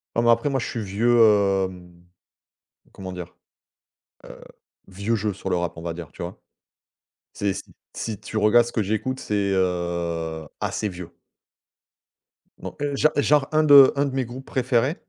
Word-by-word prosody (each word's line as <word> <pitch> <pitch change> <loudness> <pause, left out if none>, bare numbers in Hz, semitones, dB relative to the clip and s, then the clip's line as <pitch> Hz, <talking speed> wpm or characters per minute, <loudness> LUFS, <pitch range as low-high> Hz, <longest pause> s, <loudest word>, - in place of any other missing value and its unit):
Non 115 - +2
mais 120 - +3
après 115 +5 +3
moi 135 -1 0
je - - -3
suis 115 - -4
vieux 110 +5 +1 0.5
hem 90 -1 -13 1.0
comment 95 -1 -8
dire? 90 -1 -8 0.9
Heu, - - -12 0.5
vieux 100 +4 -3
jeu 105 -1 -2
sur 95 - -6
le - - +2
rap, 85 -1 -2
on 85 - -8
va 85 -1 -3
dire, 85 -3 -9
tu - - -8
vois? 85 - -8 0.9
C'est 100 -2 -1
si - - -9 0.2
si 110 -4 -4
tu 110 - -6
regardes 115 +3 +4
ce - - -7
que 110 - 0
j'écoute, 120 +6 -2
c'est, 100 -2 -1
heu, 85 -3 -2
assez 105 - -2
vieux. 90 -2 -8 1.5
Non, - - -8
heu, 145 -1 -1
gen 155 +2 +3
genre 145 -1 +3
un 155 0 +3
de 140 -3 +8
un 140 - +2
de 135 -1 -4
mes 130 -2 0
groupes 130 +3 -9
préférés. 130 +3 0
105 Hz, 175 wpm, -23 LUFS, 90-130 Hz, 1.5 s, de